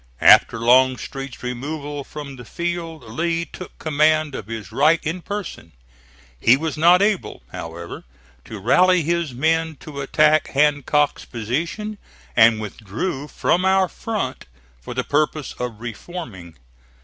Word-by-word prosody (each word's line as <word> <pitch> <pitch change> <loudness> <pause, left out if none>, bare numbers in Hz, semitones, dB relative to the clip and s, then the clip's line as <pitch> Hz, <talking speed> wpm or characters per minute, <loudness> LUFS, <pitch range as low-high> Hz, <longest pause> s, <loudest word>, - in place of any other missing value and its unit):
After - - +7
Longstreet's 130 +3 +1
removal 145 +3 -4
from 140 -1 -8
the 125 - -9
field 170 +1 -4
Lee 165 +9 -2
took 185 - -11
command 155 0 +2
of 110 -6 -6
his 110 -2 -7
right 155 +4 +4
in 170 +3 -3
person. 190 - -6 0.7
He 120 - +5
was 160 +2 -3
not 175 +5 +5
able, 205 -2 -1
however, 85 +1 -7 0.4
to 110 - -8
rally 180 - +4
his 170 -1 -1
men 160 +3 +1
to 140 -2 -7
attack 155 +2 +3
Hancock's 145 0 +1
position, 165 - -4 0.4
and 115 -1 +6
withdrew 115 - -4
from 175 +4 +1
our 190 0 +3
front 200 - -4 0.3
for - - -8
the - - 0
purpose 150 0 0
of 120 -3 -4
reforming. 115 - -8
150 Hz, 130 wpm, -21 LUFS, 120-170 Hz, 0.7 s, After